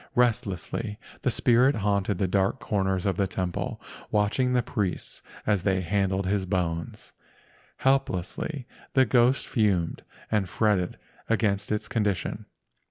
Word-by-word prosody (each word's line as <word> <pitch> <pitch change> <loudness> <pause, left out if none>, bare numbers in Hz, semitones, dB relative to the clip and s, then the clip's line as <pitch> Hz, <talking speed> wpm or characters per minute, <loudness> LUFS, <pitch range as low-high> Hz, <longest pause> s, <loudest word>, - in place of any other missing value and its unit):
Restlessly 105 -2 0 0.2
the - - +1
spirit 125 +3 +4
haunted 100 -2 0
the 95 - +1
dark 95 +7 +1
corners 95 -3 0
of 95 - +1
the 100 -2 +2
temple, 90 -1 -3 0.3
watching 105 +5 +2
the 125 -1 +3
priests 100 -4 -2 0.2
as 105 -3 +2
they 95 0 +1
handled 95 +1 0
his 95 0 0
bones. 85 -4 -2 0.6
Helplessly 135 - 0 0.3
the 130 -1 +6
ghost 125 +2 +3
fumed 100 -8 +1 0.3
and 105 -4 +1
fretted 100 -5 +1 0.3
against 105 -3 +1
its 105 - -1
condition. 105 -5 -1
100 Hz, 125 wpm, -27 LUFS, 95-115 Hz, 0.6 s, the